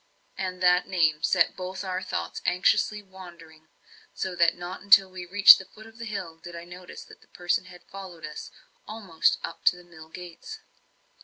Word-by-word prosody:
And 185 -1 -5
that 180 0 +4
name 160 -4 +1
set 180 0 +2
both 185 +1 -6
our 185 -1 -3
thoughts 185 - -5
anxiously 205 +3 +1
wandering; 170 -4 -15 0.5
so 190 - -3
that 170 -1 +3
not 175 +1 -7
until 200 -1 +6
we 180 -1 -8
reached 200 +2 +8
the 190 - -10
foot 215 +3 -16
of 225 +1 -16
the 230 - -6
hill 185 -7 -6
did 175 +1 -11
I 170 - -8
notice 180 +1 -11
that - - -17
the - - -23
person 175 +1 -2
had 180 -1 -15
followed 190 -4 -10
us 150 - -8 0.4
almost 205 -7 0 0.3
to - - +5
the 180 - -14
mill 160 -2 -15
gates. 180 - -10
180 Hz, 180 wpm, -26 LUFS, 175-190 Hz, 0.5 s, reached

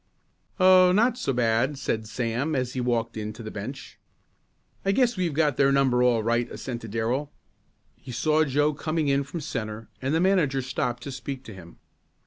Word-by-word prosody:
"Oh, 185 -1 +7
not 230 +6 +3
so 140 - 0
bad," 120 +3 +1
said 110 -4 -2
Sam 125 +6 -2
as 125 -1 -1
he 130 - -2
walked 115 -2 -1
in 105 0 -4
to 115 +2 -10
the 110 - -6
bench. 130 +7 -8 0.8
"I 195 - +2
guess 245 +1 +2
we've 175 -6 -1
got 150 -2 +2
their 140 0 +4
number 135 -3 +3
all 120 -3 +3
right," 120 +1 0
assented 120 -3 -6
Darrell. 120 +7 -1 0.6
He 130 - -11
saw 155 +6 +2
Joe 145 +1 +1
coming 155 0 -1
in 140 0 +2
from 155 +4 -6
centre 110 -6 -5
and 135 +1 -1
the - - +2
manager 165 -8 +2
stopped 125 -1 -2
to 140 - -6
speak 135 0 -6
to 110 - -10
him. 85 -3 -13
130 Hz, 185 wpm, -26 LUFS, 115-150 Hz, 0.8 s, Oh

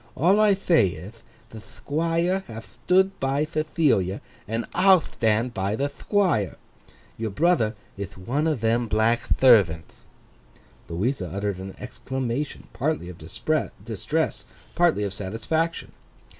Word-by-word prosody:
All 185 +8 +4
I 210 -2 +5
thay 170 - +3
ith, 100 +9 -11 0.3
the 110 - -9
Thquire 165 - -1
hath 115 -1 -11
thtood 190 +1 +4
by 135 +3 0
Thethilia, 150 - 0 0.3
and 115 +1 -2
I'll 185 0 +6
thtand 115 -3 0
by 95 +1 -1
the 140 +4 -1
Thquire. 160 - 0 0.6
Your 110 0 -2
brother 115 - +2 0.2
ith 100 -1 -6
one 125 +11 -1
them 115 +1 +1
black 110 +2 +2
thervanth.' 100 -11 +3 0.8
Louisa 95 +4 -1
uttered 100 0 -3
an 95 0 -8
exclamation, 130 +2 -4
partly 145 - -2
of 90 - -11
distress, - - -2 0.3
partly 170 -11 +2
of 100 -2 -3
satisfaction. 115 - -2
120 Hz, 120 wpm, -25 LUFS, 105-160 Hz, 0.8 s, I'll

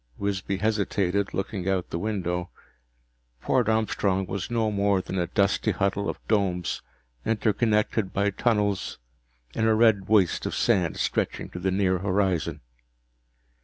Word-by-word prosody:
Wisby 100 -1 -2
hesitated, 100 -2 0
looking 95 -1 -3
out 95 -2 -1
the 85 - -2
window. 90 -3 -2 0.9
Port 120 - +1
Armstrong 100 -3 +1
was 95 +3 -4
no 115 -2 +1
more 100 -1 +2
than 95 0 -4
a 85 - 0
dusty 100 +2 +1
huddle 100 +1 0
of - - -4
domes, 95 -5 0 0.4
interconnected 110 -2 +1
by 100 +1 +1
tunnels, 105 -2 0 0.6
in 110 - +1
a 110 - +4
red 110 -4 +4
waste 100 -5 +3
of - - -3
sand 95 -9 +1
stretching - - -1
to 90 - -7
the 95 +2 0
near 95 -1 +1
horizon. 90 -5 0
100 Hz, 135 wpm, -26 LUFS, 95-105 Hz, 0.9 s, a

